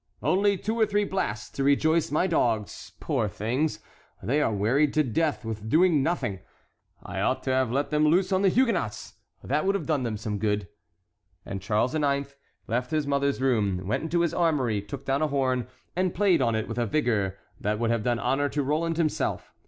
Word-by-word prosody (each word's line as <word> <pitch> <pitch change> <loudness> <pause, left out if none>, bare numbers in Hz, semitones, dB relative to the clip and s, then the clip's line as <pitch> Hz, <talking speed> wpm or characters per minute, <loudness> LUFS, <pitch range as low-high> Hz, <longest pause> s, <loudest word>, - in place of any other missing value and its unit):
"Only 200 +1 +2
two 220 +5 -3
or 220 - +4
three 205 0 +1
blasts 110 - -2
to 135 - -3
rejoice 155 +3 +3
my 155 +5 +1
dogs, 115 - -1
poor 110 - 0
things; 125 - -1 0.5
they 145 +5 +1
are 115 - +1
wearied 120 +9 +1
to 155 - +4
death 145 +1 -1
with 110 -1 -5
doing 165 0 +4
nothing. 135 - -1 0.6
I - - -5
ought - - 0
to 130 - -1
have 130 -2 +1
let 140 +3 -1
them 150 0 +3
loose 185 +5 +3
on 190 0 +2
the 195 - +4
Huguenots; 200 - 0 0.3
that 150 +3 0
would 195 +1 +1
have 200 - -2
done 155 -4 0
them 115 -4 -2 0.2
good!" 105 -1 0 0.8
And 95 - -5
Charles 105 +6 0
IX. 140 -2 0 0.3
left 125 +3 -2
his 155 -2 0
mother's 140 -1 0
room, 105 -9 +1
went 105 - -1
into 170 +2 0
his 170 - +1
armory, 135 - +1
took 100 - -8
down 135 +2 0
a 155 - +2
horn, 130 -4 0 0.3
and 185 0 0
played 195 -2 +3
on 115 -1 +2
it 110 - -2
with 115 +1 -4
a 120 - 0
vigor 105 -8 0 0.2
that 105 +1 -1
would 115 +1 0
have 115 -1 +1
done 120 +2 0
honor 145 +4 0
to 145 0 -1
Roland 160 +4 0
himself. 160 -3 -1
140 Hz, 200 wpm, -26 LUFS, 115-160 Hz, 0.8 s, or